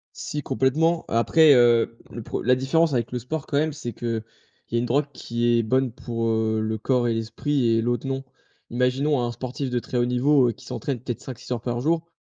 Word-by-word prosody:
Si 150 -1 -4
complètement 155 +6 +1
après, 145 +7 +5
heu, 120 -1 +4
le 120 - -7
pre - - -4
la 125 +1 +3
différence 150 +4 +2
avec 120 0 -1
le 125 - -1
sport 155 +5 -4
quand 145 - 0
même 155 +1 +1
c'est 140 -5 -6
qu'il 115 -2 -3 0.5
y - - -4
a - - +3
une 120 - 0
drogue 140 +5 +2
qui 120 -1 0
est - - +2
bonne 130 +1 +1
pour, 115 -1 -3
heu, 110 -1 +1
le 110 0 -2
corps 125 +2 +1
et 115 - +1
l'esprit 120 +4 -1
et 115 0 +3
l'autre 120 +3 -1
non. 135 0 -3 0.5
Imaginons 125 +3 +1
un 120 - -1
sportif 130 +2 -4
de 125 - 0
très 120 +1 -3
haut 120 - +3
niveau, 125 +1 +3
heu, - - 0
qui 130 +1 -16
s'entraîne 135 -2 -3
peut-être 120 -1 -5
5-6 125 -1 -8
heures 120 - -2
par 120 0 -3
jour. 165 +4 0
125 Hz, 225 wpm, -24 LUFS, 115-140 Hz, 0.5 s, après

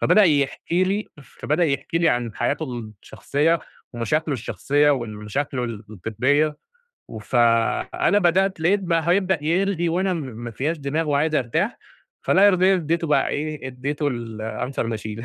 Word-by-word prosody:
فبدأ 215 - +5
يحكي 160 +3 +1
لي 200 +3 -1
فبدأ 155 +5 -1
يحكي 140 +2 -1
لي 170 -1 +3
عن 120 -5 -1
حياته 150 +6 -1 0.4
الشخصية 160 +4 0 0.3
ومشاكله 150 +7 -1
الشخصية 145 +4 +1
وال 120 -6 -2
مشاكله 125 +4 -3
ال 115 -2 -6
الجدية، 130 - 0 0.5
وف 110 +3 -5
أنا 115 - +2
بدأت 190 0 +2
لقيت 190 +5 +3
بقى 170 -3 0
هيبدأ 185 -3 +2
يرغي 175 +1 +1
وأنا 185 +3 0
م - - -3
ما 120 -4 -7
فيّاش 150 +9 -2
دماغ 150 +3 -2
وعايز 150 +2 +1
أرتاح، 120 -5 0 0.4
فلا 195 +2 +5
يرضيني 190 -1 +4
إديته 165 0 -1
بقى 150 - +2
إيه، 150 -2 -4
إديته 140 +4 -2
الanswer 115 +1 -4
machine، 110 +1 -7
145 Hz, 145 wpm, -23 LUFS, 120-170 Hz, 0.5 s, فبدأ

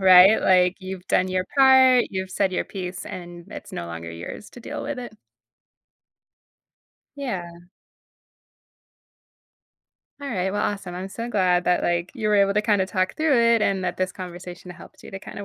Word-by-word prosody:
right? 190 +2 +7
Like, 180 -1 +4
you've 190 -1 -8
done 185 +1 +2
your 185 0 -1
part, 260 -2 +6
you've 190 -1 -4
said 190 0 0
your - - -1
piece, 185 0 -6
and 175 -1 -9
it's - - -9
no 85 - -5
longer 85 0 -7
yours 85 - -9
to 245 - -13
deal - - -6
with 280 -2 -4
it. 245 -3 -7 2.0
Yeah. 190 -11 -4 2.7
Alright, 190 -9 -2
well, 205 - -1
awesome. 195 -3 -3
I'm 185 +2 -5
so 230 +4 -6
glad 180 -5 +2
that, 180 - +2
like, 175 +1 -1
you 220 -5 -2
were 210 - +3
able 200 0 +3
to 210 - +2
kind 210 -3 +2
of 190 - 0
talk 185 0 -1
through 310 -3 +2
it, 235 -1 +4
and 195 -2 +1
that 180 -1 -2
this 185 0 -2
conversation 180 0 -9
helped 175 - -14
you - - -11
to 195 - -6
kinda 200 0 -9
190 Hz, 175 wpm, -23 LUFS, 180-210 Hz, 2.7 s, right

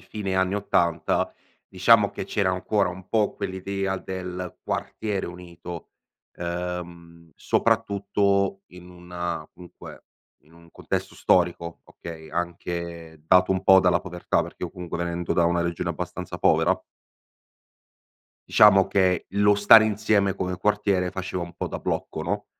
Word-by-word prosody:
fine 100 -3 -5
anni 95 +1 +1
'80, 85 -5 0 0.4
diciamo 100 +2 +4
che - - -6
c'era 100 -1 0
ancora 95 +2 0
un 90 +1 -9
po' 110 -3 +1
quell'idea 95 +1 -3
del 90 -2 -6
quartiere 105 -3 -3
unito, 85 -1 -9 0.4
ehm, 85 -1 -6
soprattutto 100 -1 +1
in 90 0 -13
una 90 -2 -6
comunque, 90 0 -13 0.4
in 75 - -25
un 85 0 -18
contesto - - -4
storico, 85 -1 +1
okay, 80 -2 -10
anche 85 -2 -5
dato 90 +3 +4
un 95 - -2
po' 95 - +7
dalla 90 -1 +3
povertà, 90 -1 -1
perché - - -7
io - - -6
comunque 90 -2 -6
venendo 85 0 -2
da 85 - +2
una 85 0 +2
regione 85 -1 -2
abbastanza - - -6
povera - - +3 1.8
diciamo 95 -2 +6
che, 95 -2 +1
lo 100 +1 +3
stare 105 +2 +7
insieme 105 -2 +1
come 90 -1 -3
quartiere 100 -1 +1
faceva 95 -1 -4
un 85 - -13
po' - - -4
da - - -5
blocco, - - -3
no, - - -3
90 Hz, 135 wpm, -25 LUFS, 85-100 Hz, 1.8 s, po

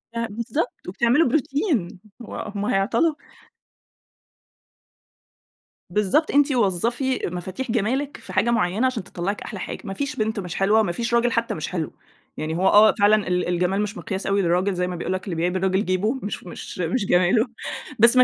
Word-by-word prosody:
آه 230 - 0
بالضبط، 235 - -4
وبتعملوا 235 - +3
بروتين. 275 - 0 0.2
هو 230 - -8 0.2
هم 205 0 -2
هيعطلوا. 225 +13 +2 2.8
بالضبط، 210 - +2
أنتِ 290 0 +4
وظّفي 240 +4 +1
مفاتيح 185 +8 -4
جمالِك 255 +6 -1
في - - -11
حاجة 205 +5 +2
معيّنة 215 +1 +1
عشان 235 -7 -3
تطلّعِك 195 +3 -4
أحلى 205 -4 -6
حاجة. - - -5
ما 195 - -5
فيش 280 +6 -3
بنت 220 0 -1
مش 180 -3 -5
حلوة 205 +3 +3
وما 205 -5 +1
فيش 230 +6 -3
راجل 235 0 +3
حتّى 230 0 0
مش 155 - -4
حلو. 165 -4 -3 0.4
يعني 155 +1 -3
هو 190 +2 +2
آه 210 +2 +7
فعلًا 205 0 +4
ال 180 0 0
الجمال 180 +3 +1
مش 210 +1 -3
مقياس 190 -1 -4
أوي 200 +1 +2
للراجل 185 +2 +1
زي 180 0 -1
ما 180 - -4
بيقول 175 +2 -3
لك، 185 - -3
اللي 185 -5 -3
بيعيب 175 +3 0
الراجل 190 +2 +1
جيبه، 185 +5 +1
مش 205 - -2
ف - - -15
مش 175 - -8
مش 185 +6 0
جماله. 185 +6 +3 0.5
بس 235 +3 +6
ما 255 - +9
205 Hz, 180 wpm, -23 LUFS, 180-235 Hz, 2.8 s, ما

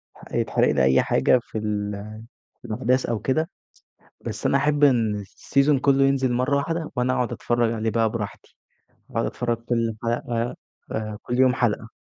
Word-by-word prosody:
ح - - -15
يتحرق - - +2
لي 65 - +2
أي 65 +1 +5
حاجة 65 - +3
في - - -7
ال 105 -1 -2 0.7
في - - -11
الأحداث 125 +3 +1
أو 115 -2 -1
كده، 155 - 0 0.7
بس - - -4
أنا - - +3
احب 150 -1 +2
إن 115 -6 +3
السيزون 140 +8 +1
كلّه 135 0 +3
ينزل 135 -2 +2
مرّة 125 +3 +1
واحدة، 165 +3 -2
وأنا 125 +1 +1
اقعُد 125 -2 -1
اتفرّج 120 -1 0
عليه 110 0 -1
بقى 115 0 +1
براحتي، 105 -3 -6 0.5
واقعُد - - -1
اتفرّج 120 -1 -2
كل 115 -1 -1
حلقة 120 0 -1 0.4
آآ، 110 -1 -3
كل 125 +1 -3
يوم 130 -1 +5
حلقة. 115 -3 0
120 Hz, 170 wpm, -24 LUFS, 110-130 Hz, 0.7 s, أي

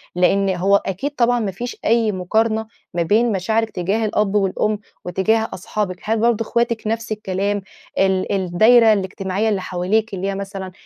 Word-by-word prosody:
لأن 195 +2 +3
هو 195 +3 +3
أكيد 200 +8 -1
طبعًا 245 -1 +2
ما 210 -4 -2
فيش 240 +6 -6
أي 225 -1 +3
مقارنة 220 +4 0 0.3
ما 175 - 0
بين 225 +7 +2
مشاعرِك 220 +4 0
تجاه 200 +4 -1
الأب 210 -1 0
والأم 205 +1 +1 0.3
وتجاه 220 +5 +1
أصحابِك 185 -1 -3
هل 220 +1 0
برضه 230 0 +2
اخواتِك 235 -1 -1
نفس 225 0 -2
الكلام، 205 -1 -1 0.4
ال 190 -1 +1
الدايرة 215 +5 +5
الاجتماعية 195 +2 -1
اللي 200 -3 0
حواليكِ 190 +5 -1
اللي 190 0 -3
هي 195 - -2
مثلًا 195 -1 -6
205 Hz, 160 wpm, -20 LUFS, 190-225 Hz, 0.4 s, الدايرة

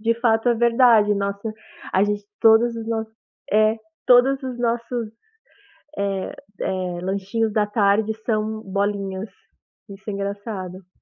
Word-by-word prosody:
De 230 +1 +2
fato 225 0 +2
é 235 - +3
verdade, 230 -3 +4
nossa, 200 +2 -3 0.4
a 190 +2 +4
gente 205 0 -1 0.2
todos 230 +1 +5
os 225 - -6
nossos 220 -1 -3 0.4
é, 215 +2 +4 0.3
todos 265 +2 +5
os 255 -2 -5
nossos, 235 -1 -1 0.9
eh 195 -1 -2 0.3
eh, 180 -2 -2
lanchinhos 200 +4 -1
da 210 -1 +2
tarde 210 +1 +2
são 215 -1 -1
bolinhas, 200 0 -2 0.6
isso 195 +1 -8
é - - -3
engraçado. 200 -2 -6
215 Hz, 130 wpm, -22 LUFS, 200-230 Hz, 0.9 s, todos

